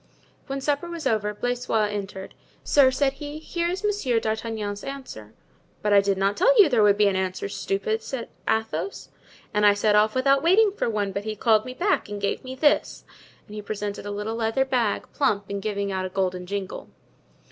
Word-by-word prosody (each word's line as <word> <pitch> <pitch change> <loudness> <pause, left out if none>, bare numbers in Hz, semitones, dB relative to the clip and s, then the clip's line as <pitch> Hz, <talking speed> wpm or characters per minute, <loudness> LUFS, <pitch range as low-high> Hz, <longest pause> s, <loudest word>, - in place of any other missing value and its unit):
When 275 0 -4
supper 290 +4 -1
was 335 -3 -6
over 215 -4 +1
Blaisois 240 -1 -1
entered. 195 -2 -6 0.3
"Sir," 280 -2 +5
said 270 +1 +1
he, 295 +1 -7
"here 340 +2 -3
is 375 +3 -4
Monsieur 405 - +1
d'Artagnan's 220 -2 -3
answer." 260 - -8 0.5
"But 210 -1 +2
I 200 - +7
did 195 -1 0
not 195 +1 +1
tell - - +4
you 405 - +9
there 240 -5 +3
would 205 -1 +5
be 210 - +4
an 195 - +1
answer, 190 0 -2
stupid!" 200 +2 -2
said 240 0 -5 0.2
Athos. 225 - -2 0.4
"And 210 0 +1
I 205 -1 +6
set 210 0 +2
off 215 +2 +3
without 275 +1 +3
waiting 395 +6 +4
for 385 - -2
one, 205 -3 -1
but 200 +1 -4
he 215 0 -3
called 215 0 +3
me 255 0 -7
back 375 - 0
and 205 0 -5
gave 200 0 -2
me 260 0 -7
this;" 290 +2 +1 0.4
and 210 - -13
he 210 - -5
presented 205 -1 -5
a - - -4
little 210 +2 -3
leather 230 +4 +1
bag, 240 -6 0
plump 205 -8 +1
and 200 0 -3
giving 200 -1 -2
out 190 -1 -2
a - - -9
golden 185 -1 -2
jingle. 200 -1 -5
215 Hz, 200 wpm, -25 LUFS, 200-270 Hz, 0.5 s, you